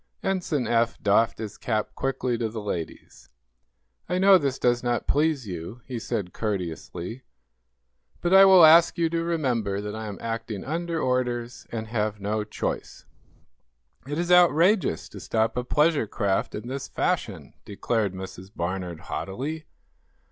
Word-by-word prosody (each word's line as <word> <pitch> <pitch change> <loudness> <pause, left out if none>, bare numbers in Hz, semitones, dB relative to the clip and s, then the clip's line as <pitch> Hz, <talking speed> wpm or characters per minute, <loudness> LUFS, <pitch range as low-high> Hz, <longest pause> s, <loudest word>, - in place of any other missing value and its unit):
Ensign 175 -8 -1
Eph 115 0 +1
doffed 105 +2 +3
his 105 -2 -7
cap 110 -3 -2
quickly 130 -2 -1
to 115 -1 -2
the 110 +1 -6
ladies. 90 -6 -6 0.8
"I 180 - 0
know 190 0 +7
this 140 -4 -1
does 120 -1 +2
not 120 -1 -1
please 150 -5 +1
you," 90 +6 -7
he 125 -3 -5
said, 105 -6 -3
courteously, 90 +1 -4 1.0
"but 175 +1 0
I 195 0 +9
will 190 -3 +8
ask 165 +3 +6
you 165 -1 +1
to 165 0 0
remember 125 -12 -1
that 105 +1 -5
I 110 0 -5
am 100 -2 -6
acting 115 -3 -4
under 165 +3 -2
orders, 125 -2 -2
and 110 -1 -4
have 105 -2 -1
no 105 +2 -1
choice." 105 - -5 1.0
"It 145 +1 -3
is 175 +1 -1
outrageous 175 - +4
to - - -10
stop 110 0 0
a 125 - -1
pleasure 150 -1 +2
craft 100 -2 -1
in 110 +3 -6
this 135 +1 -5
fashion!" - - -2
declared 105 -1 -2
Mrs. 95 0 -8
Barnard, 90 -1 -4
haughtily. 140 - -5
120 Hz, 150 wpm, -25 LUFS, 105-155 Hz, 1.0 s, I